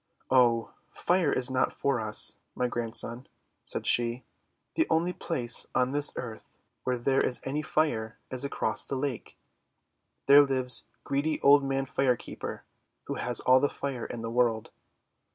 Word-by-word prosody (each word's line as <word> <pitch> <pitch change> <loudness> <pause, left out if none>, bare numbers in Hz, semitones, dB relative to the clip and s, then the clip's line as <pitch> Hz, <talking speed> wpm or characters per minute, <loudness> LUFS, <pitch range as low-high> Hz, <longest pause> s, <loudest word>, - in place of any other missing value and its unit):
"Oh, 120 -3 +3 0.2
Fire 175 -3 0
is 130 0 0
not 130 0 +1
for 135 -3 -1
us, 110 -1 +2 0.2
my 125 - -1
Grandson," 120 +1 +2 0.4
said - - -3
she. 120 +1 +1 0.5
'The 325 - +1
only 170 +3 +1
place 125 -11 -1
on 125 0 +1
this 145 +1 +3
Earth 115 -3 -9 0.3
where 125 -1 0
there 135 +3 +1
is 125 - +1
any 145 +3 -3
Fire 120 -9 -1
is 130 0 -1
across 140 - 0
the 140 - -4
lake. 135 -2 -5 0.9
There 140 +1 +8
lives 130 -3 +2 0.2
greedy 145 +3 -2
Old 140 0 +5
Man 135 0 -2
Fire 130 -1 0
Keeper, - - -8 0.4
who - - -5
has - - 0
all 130 +1 +5
the 145 - +1
Fire 135 -4 -5
in 115 -1 -7
the 115 - -5
world." 115 -2 0
130 Hz, 155 wpm, -28 LUFS, 120-140 Hz, 0.9 s, There